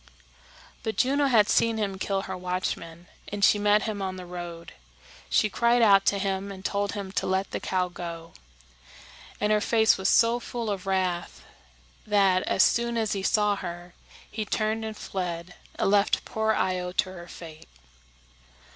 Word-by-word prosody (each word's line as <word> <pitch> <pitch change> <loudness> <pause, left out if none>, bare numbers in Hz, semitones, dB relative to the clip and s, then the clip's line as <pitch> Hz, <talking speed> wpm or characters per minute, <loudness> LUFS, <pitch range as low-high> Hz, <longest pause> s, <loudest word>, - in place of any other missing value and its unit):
But 220 - -4
Juno 280 +2 +2
had 220 -5 +4
seen 230 -1 +2
him 195 -3 -2
kill 195 0 -1
her - - -5
watchman, 180 -2 -4 0.2
and 200 0 +1
she 210 - +4
met 205 0 +3
him 210 -3 -3
on 190 -1 -3
the 185 -1 -8
road. 175 -1 -8 0.6
She - - +3
cried 235 +3 +2
out 195 -2 +5
to 200 - +3
him 195 0 -2
and 190 -1 -10
told 200 0 -1
him 200 -3 -5
to - - -1
let 190 +1 -1
the - - -3
cow 185 -1 -1
go; 170 -2 -8 1.1
and 210 +1 +1
her 210 0 +3
face 220 -2 +3
was 190 - +1
so 235 +1 +4
full 235 -2 -4
of 195 -1 -5
wrath 185 -2 -1 0.6
that, 195 -3 +3
as - - +4
soon 235 0 +1
as 220 -3 0
he 195 - -2
saw 210 +1 +2
her, 175 -1 -7 0.4
he 215 - -3
turned 215 +1 -1
and 220 -1 -5
fled, 180 -2 -5 0.2
and - - +1
left 205 0 +2
poor 220 0 0
Io 180 -3 -1
to 185 0 0
her 175 -2 -10
fate. 160 - -11
195 Hz, 175 wpm, -26 LUFS, 180-215 Hz, 1.1 s, out